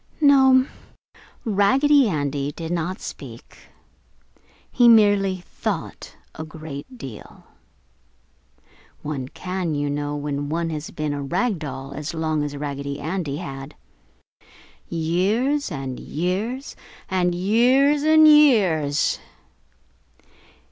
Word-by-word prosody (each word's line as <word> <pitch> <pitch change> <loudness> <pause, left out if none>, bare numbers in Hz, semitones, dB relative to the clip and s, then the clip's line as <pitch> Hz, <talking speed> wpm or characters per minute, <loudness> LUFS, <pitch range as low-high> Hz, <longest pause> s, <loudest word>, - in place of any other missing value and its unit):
No, 265 -3 +5 0.8
Raggedy 260 +6 +4
Andy 145 -3 -2
did 165 +2 -7
not 175 +2 -2
speak; 120 -4 -10 1.0
he 240 -2 +4
merely 205 -4 +4
thought - - -5 0.2
a 160 - -7
great 155 - -9
deal. 125 - -10 1.6
One 145 -4 -4
can, 180 +1 -4
you 145 0 -1
know, 145 0 -3
when 145 -1 -3
one 165 +1 -2
has 155 0 -5
been 150 -1 -3
a 145 - -4
rag 185 - -1
doll 135 -2 -7
as 150 +3 -5
long 155 -1 -1
as 145 -1 -5
Raggedy 140 0 -5
Andy 155 -2 -3
had. 135 -3 -8 1.1
Years 195 - 0
and 135 -4 -5
years 205 - -3 0.3
and 180 -2 0
years 250 +10 +3
and 310 +1 +6
years! 195 - +4
165 Hz, 105 wpm, -22 LUFS, 145-225 Hz, 1.6 s, and